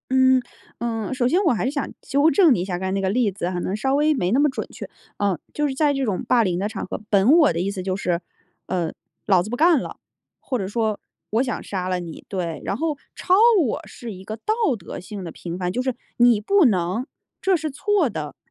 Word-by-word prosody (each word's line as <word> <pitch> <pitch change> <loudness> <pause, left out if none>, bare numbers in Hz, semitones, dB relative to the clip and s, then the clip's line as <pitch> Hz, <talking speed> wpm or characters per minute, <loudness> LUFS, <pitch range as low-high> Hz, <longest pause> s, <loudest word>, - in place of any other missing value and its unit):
嗯， 260 0 +5 0.4
嗯， 225 -1 -2
首 255 -1 0
先 350 +9 +3
我 325 - +4
还 225 - -1
是 260 - 0
想 285 -1 -3
纠 285 +3 +3
正 335 -4 +5
你 195 - 0
一 - - -2
下， 180 -2 -3
刚 190 +1 -3
才 - - -1
那 195 - 0
个 190 -1 0
例 225 0 +2
子 185 -2 -4
可 180 -1 -3
能 185 - -2
稍 265 +5 +1
微 300 +2 +3
没 190 -10 0
那 260 - +4
么 295 - +4
准 265 - -4
确。 - - -9 0.3
嗯， 200 -5 0
就 295 - 0
是 275 - -2
在 290 +1 +2
这 275 -1 -1
种 205 -7 -1
霸 240 -2 +4
凌 180 -3 0
的 200 - 0
场 215 -2 -5
合， 185 - -6
本 200 +4 +4
我 315 - +6
的 165 - -2
意 195 +2 -1
思 195 -2 -5
就 185 0 -2
是： 180 -3 -1 0.5
“呃， 175 -3 -1 0.3
老 190 -4 +4
子 205 - -5
不 245 - -2
干 320 +2 +5
了”， - - -6 0.5
或 255 - -2
者 190 - -2
说 215 0 -1 0.3
“我 225 +4 +2
想 245 -4 -3
杀 185 -2 -3
了 180 -1 -1
你” 165 -2 -9
对， 175 -5 -3
然 - - -1
后 310 +4 -1 0.2
超 365 - +2 0.3
我 225 - -1
是 235 -2 -8
一 190 -1 -10
个 215 - -5
道 330 - -1 0.2
德 175 - -8
性 195 +1 -8
的 170 - -6
评 170 +1 -6
判， 180 -1 -2
就 245 - -1
是 255 -1 -1 0.2
“你 240 -3 +5
不 390 - +4
能， 190 +1 +1 0.4
这 385 -1 +3
是 315 -2 -2
错 380 +1 +1
的。” 150 - -5
220 Hz, 270 characters per minute, -23 LUFS, 185-270 Hz, 0.5 s, 我